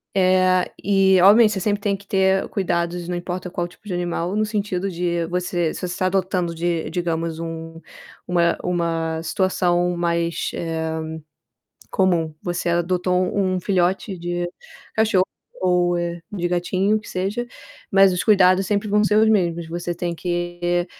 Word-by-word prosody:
Eh, 185 -1 +3
e 190 -2 +4
obviamente, 210 +3 +7
você 190 - -2
sempre 205 +1 0
tem 200 -1 0
que 200 +1 -14
ter 190 0 +2
cuidados, 175 -2 -1
não 180 - -2
importa 180 +1 -4
qual 175 -3 -2
o - - -5
tipo 180 +4 -19
de 185 - -3
animal, 175 +1 -2
no 215 - +2
sentido 200 -3 -2
de 170 -1 -1
você 175 -2 -1
se - - -7
você - - -2
está 180 +1 -1
adotando 185 -2 0
de, 170 0 -1
digamos, 165 -2 -2
um 165 0 -6 0.5
uma 170 -1 +2
uma 165 -2 -1
situação 175 0 +1
mais, 170 -1 -1
eh, 165 -1 -3 1.1
comum. 170 -6 +1
Você 175 0 -2
adotou 180 +1 0 0.2
um 185 -2 +1
filhote 185 0 0
de 175 0 -2 0.5
cachorro 215 -4 +3 0.4
ou, 180 -1 +2
eh, 170 0 -3
de 175 -3 -1
gatinho, 185 +4 +1
que 210 - -13
seja, 200 +6 -2 0.5
mas 195 -1 +6
os 180 - -1
cuidados 190 -2 +5
sempre 205 0 0
vão 210 +1 +3
ser 210 +1 +2
os 220 - +5
mesmos. 170 -6 +1
Você 175 +1 -3
tem 175 0 -3
que, 175 0 -1
180 Hz, 160 wpm, -22 LUFS, 175-190 Hz, 1.1 s, obviamente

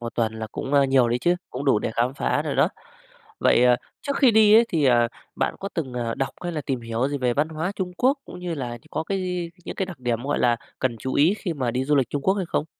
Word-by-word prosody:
Một 115 -1 -6
tuần 115 -2 0
là 110 - -4
cũng, 135 - -4
ơ, 140 -1 +6
nhiều 135 -3 +3
đấy 120 +1 +1
chứ, 175 +8 +2 0.2
cũng 130 +3 -5
đủ 135 -7 +4
để - - -2
khám 125 +3 +1
phá - - 0
rồi - - -3
đó. - - +4 0.7
Vậy, 120 - +4
ờ, 125 0 +5 0.3
trước 280 -1 -2
khi 265 -4 +5
đi 215 -1 +6
ấy 230 +2 +7
thì, 155 -4 +1
ờ, 120 -2 +4 0.3
bạn - - 0
có 195 - -3
từng, 140 -7 -3
ờ, 120 -2 -2
đọc 135 -1 -2
hay 175 - -3
là 155 - -2
tìm 135 -3 -3
hiểu 115 +3 -1
gì 145 0 -3
về 125 -2 +1
văn 150 +2 +1
hóa 160 +4 -3
Trung 180 -2 -3
Quốc 265 +3 +2
cũng - - -10
như 175 -2 -3
là 130 -5 -4
như 120 - -10
có 155 - -2
cái 195 +3 -2
gi 180 -2 -3
những - - -5
cái 190 - -2
đặc 180 -5 -9
điểm, 120 -2 -1
gọi 145 - 0
là, 120 -1 +3 0.2
cần 125 -3 -1
chú 130 +4 -4
ý 160 +7 +4
khi 180 - -3
mà 130 -5 -1
đi 130 +2 -1
du 145 +2 +2
lịch 130 -4 +1
Trung 145 - -2
Quốc 190 - +3
hay 195 -3 -2
không? 155 - -1
140 Hz, 295 wpm, -24 LUFS, 125-175 Hz, 0.7 s, ấy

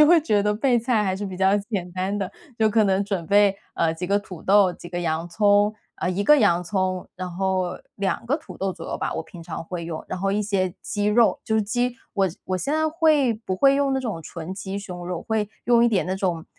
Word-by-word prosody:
就 300 - +10
会 340 0 +6
觉 210 -9 +2
得 210 0 +2
备 245 +3 +2
菜 225 -3 +1
还 190 -1 0
是 205 +2 -4
比 190 -2 -5
较 190 +2 +3
简 200 -4 -3
单 190 +2 -2
的， 195 -2 -3 0.3
就 220 -1 +4
可 220 +1 +3
能 195 0 +2
准 195 -4 -2
备， 200 -1 +4 0.2
呃， 165 -1 +1
几 170 +2 -5
个 200 +2 +2
土 185 -5 -10
豆、 195 -2 +5
几 175 - -11
个 175 - -3
洋 165 0 -1
葱 205 +2 +3 0.2
啊， - - -2
1 185 +2 0
个 300 +8 +6
洋 175 -9 +3
葱， 185 0 -2
然 185 0 -5
后 185 0 -1 0.2
2 200 +3 -2
个 280 +5 +2
土 320 - -12
豆 195 0 -1
左 - - -9
右 - - -3
吧， - - -2
我 - - -2
平 170 -2 -12
常 165 -1 -6
会 170 -1 -5
用， 160 -2 -5
然 - - -4
后 195 +1 0
一 210 +1 +1
些 190 -3 -1
鸡 205 -1 -2
肉， 225 +2 +3
就 220 - -1
是 220 - +3
鸡 245 +3 -1 0.2
我 195 -2 +2 0.2
我 185 - -1
现 285 - -1
在 315 0 +2
会 310 -6 +3
不 185 - -1
会 275 +5 +5
用 280 -1 +1
那 265 - 0
种 220 -10 -4
纯 165 +3 -7
鸡 195 0 -5
胸 180 -3 -7
肉， 180 -2 -4
会 220 -2 0 0.2
用 235 0 +5
一 - - +5
点 205 -5 +1
那 185 - -1
种， 175 -4 -1
200 Hz, 265 characters per minute, -24 LUFS, 185-220 Hz, 0.3 s, 就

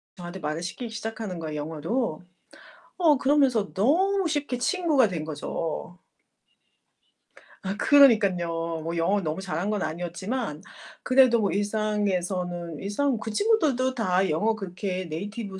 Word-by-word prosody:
저한테 175 +1 -8
말을 155 +1 -3
시키기 230 +7 -5
시작하는 220 -4 -5
거예요, 155 -2 -5
영어로. 160 - -2 0.7
어 320 -5 +4
그러면서 265 -6 +2
너무 360 - +2
쉽게 290 -5 -2
친구가 300 -3 +2
된 165 -5 -4
거죠. 160 +3 -4 1.7
아 195 +1 -3
그러니깐요. 180 - +4
뭐 165 +1 -3
영어를 195 +4 +1
너무 155 +2 -2
잘한 190 0 -3
건 210 -2 -1
아니었지만 175 - -4 0.4
그래도 255 -2 +5
뭐 200 -4 +1
일상에서는 185 -5 -1
일상 240 +6 0
그 220 - -5
친구들도 275 - +2
다 190 -6 +1
영어 215 +8 +1
그렇게 185 -2 -4
네이티브 195 +4 -6
200 Hz, 305 characters per minute, -26 LUFS, 175-245 Hz, 1.7 s, 그래도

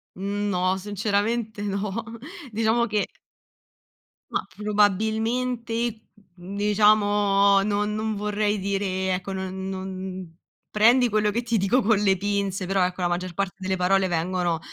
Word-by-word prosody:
No, 190 -1 -1
sinceramente 210 +2 -1
no. 200 0 -2 0.6
Diciamo 225 +2 +2
che 210 -1 0 1.2
Mah, - - -1
probabilmente, 220 +3 0 0.4
n 190 +3 -8
diciamo 205 -1 +4
non 210 0 0
non 220 0 -2
vorrei 210 0 0
dire, 200 +1 -1
e 190 0 -2
ecco, 190 +1 -5
non 190 0 -4
non 185 -2 -6 0.3
prendi 240 +4 +5
quello 210 -1 +1
che 235 +3 -1
ti 230 -1 0
dico 205 +7 +2
con 220 -1 +3
le 195 -2 +3
pinze, 200 -1 -1
però 190 0 +1
ecco, 180 +1 -4
la 175 - +1
maggior 175 +1 -3
parte 195 0 -2
delle 190 0 -2
parole 190 +1 +2
vengono, 175 0 0
uhm, - - -7
205 Hz, 140 wpm, -25 LUFS, 190-215 Hz, 1.2 s, prendi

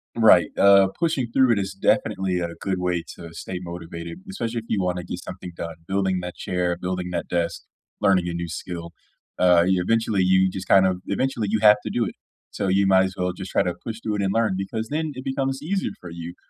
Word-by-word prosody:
Right, 105 -8 +6
uh, 100 -1 +7
pushing 150 -8 0
through 130 -3 +5
it 105 - 0
is 95 0 -3
definitely 95 -1 +1
a 85 -1 -2
good 95 -2 -1
way 90 -2 -1
to 85 -1 -10
stay 90 +2 -6
motivated, 85 - -7
especially 115 - -3
if 115 - -11
you 105 - 0
wanna 90 -1 -1
get 90 - -5
something 90 -1 -8
done: 85 -1 -6
building 95 -1 0
that 90 0 -6
chair, 90 -1 -1
building 90 0 -3
that 85 -1 -3
desk, 85 -1 -1 0.4
learning 90 -3 +3
a - - -3
new 85 0 -3
skill. 85 +1 -6 0.5
Uh, 90 -2 +6
you, 95 -1 +2
eventually 115 0 +1
you 95 0 +4
just, 95 -1 -6
kind 95 -1 +6
of 90 -1 0
eventually, 115 +1 -1
you 110 +1 +1
have 105 -1 +7
to - - -4
do 120 -2 0
it. - - -5 0.4
So, - - -2
you 95 +1 +3
might 95 0 +5
as 95 0 -5
well 90 0 0
just 95 0 -7
try - - +2
to 90 -2 -1
push 115 -1 -5
through 105 -1 -1
it - - -1
and 95 -1 +1
learn, 115 -3 +2
because 105 +4 -3
then 155 0 -2
it 130 - -8
becomes 135 0 -2
easier 190 +5 -1
for 85 - -10
you. 85 +1 -7
95 Hz, 230 wpm, -24 LUFS, 90-110 Hz, 0.5 s, uh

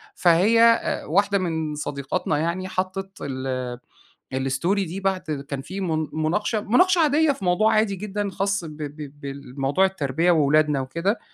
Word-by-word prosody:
فهي 185 +7 +4
أ 230 0 +3
واحدة 200 +5 +2
من 160 -4 -2
صديقاتنا 145 +1 -2
يعني 170 +4 -2
حطِّت 190 +1 -3
ال 130 -2 -4 0.7
الstory 170 +8 +1
دي 185 +4 -5
بعد 195 -1 0 0.3
كان 140 -1 -3
في 190 +7 -7
مُن 160 -3 -1
مُناقشة، 180 +8 0
مُناقشة 360 - +3
عاديّة 305 0 +3
في 200 -8 -6
موضوع 195 +5 +3
عادي 215 -2 +2
جدًا 205 +1 -3
خاص 195 0 -1
ب 155 -1 -9
ب 145 -1 -7
بال 140 -2 -8
بموضوع 140 +7 +2
التربية 165 -1 +1
وأولادنا 150 -2 +3
وكده، 170 - -1
175 Hz, 155 wpm, -23 LUFS, 145-200 Hz, 0.7 s, فهي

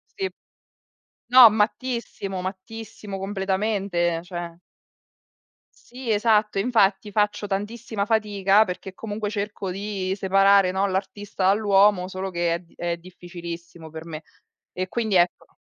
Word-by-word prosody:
sì. 390 -2 -2 1.0
No, 250 -3 +10
mattissimo, 210 -3 -2
mattissimo 200 +2 -7
completamente, 190 -3 -1
cioè. 175 -1 -7 1.3
Sì, 245 -2 -5
esatto, 210 -1 +2
infatti 205 -3 +2
faccio 210 0 0
tantissima 205 +1 -3
fatica 210 -2 +3
perché 190 0 -6
comunque 210 0 -4
cerco 205 -2 -4
di 195 0 -3
separare, 195 -1 +4
no, 195 +1 +1
l'artista 190 0 -2
dall'uomo 200 -2 +4
solo 190 0 -4
che 170 -1 0
è 170 - -2
d 170 - -25
è 175 0 -2
difficilissimo 170 -1 -10
per 160 +1 -9
me. 160 -1 -7 0.5
E 185 0 -3
quindi 220 -2 -1
ecco. 175 0 +1
195 Hz, 120 wpm, -24 LUFS, 185-210 Hz, 1.3 s, No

